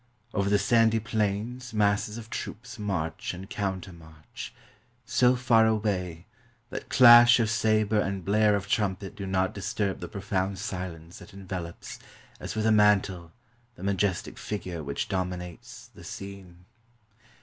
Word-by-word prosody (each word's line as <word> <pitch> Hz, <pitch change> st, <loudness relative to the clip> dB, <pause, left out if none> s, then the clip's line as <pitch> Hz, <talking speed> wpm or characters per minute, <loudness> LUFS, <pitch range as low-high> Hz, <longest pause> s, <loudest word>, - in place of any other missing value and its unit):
Over 100 Hz, -1 st, 0 dB
the 105 Hz, -, +4 dB
sandy 115 Hz, +2 st, +3 dB
plains 110 Hz, +3 st, -2 dB
masses 105 Hz, +1 st, +1 dB
of 115 Hz, 0 st, -10 dB
troops 120 Hz, +1 st, -6 dB
march 90 Hz, -6 st, -3 dB
and 95 Hz, +2 st, -9 dB
countermarch, 90 Hz, -6 st, -6 dB, 0.5 s
so 125 Hz, 0 st, +3 dB
far 115 Hz, -3 st, +4 dB
away 95 Hz, -6 st, -1 dB, 0.5 s
that -, -, -6 dB
clash 120 Hz, -1 st, +8 dB
of 110 Hz, -2 st, +1 dB
saber 110 Hz, -1 st, +2 dB
and 100 Hz, -3 st, -2 dB
blare 105 Hz, +1 st, +3 dB
of 100 Hz, -1 st, -3 dB
trumpet 100 Hz, -1 st, -1 dB
do 100 Hz, -1 st, -6 dB
not 95 Hz, 0 st, 0 dB
disturb 100 Hz, 0 st, -2 dB
the -, -, -6 dB
profound 100 Hz, -2 st, -2 dB
silence 90 Hz, -4 st, -6 dB
that 105 Hz, -, -14 dB
envelopes, 90 Hz, -3 st, -7 dB, 0.4 s
as -, -, -6 dB
with 110 Hz, 0 st, -1 dB
a 110 Hz, -, +4 dB
mantle, 100 Hz, -5 st, +3 dB, 0.4 s
the 90 Hz, -, -11 dB
majestic 100 Hz, -2 st, -1 dB
figure 90 Hz, -6 st, -5 dB
which 70 Hz, 0 st, -3 dB
dominates 90 Hz, -2 st, -5 dB
the -, -, -14 dB
scene. 95 Hz, -3 st, -9 dB
100 Hz, 140 wpm, -27 LUFS, 95-110 Hz, 0.5 s, clash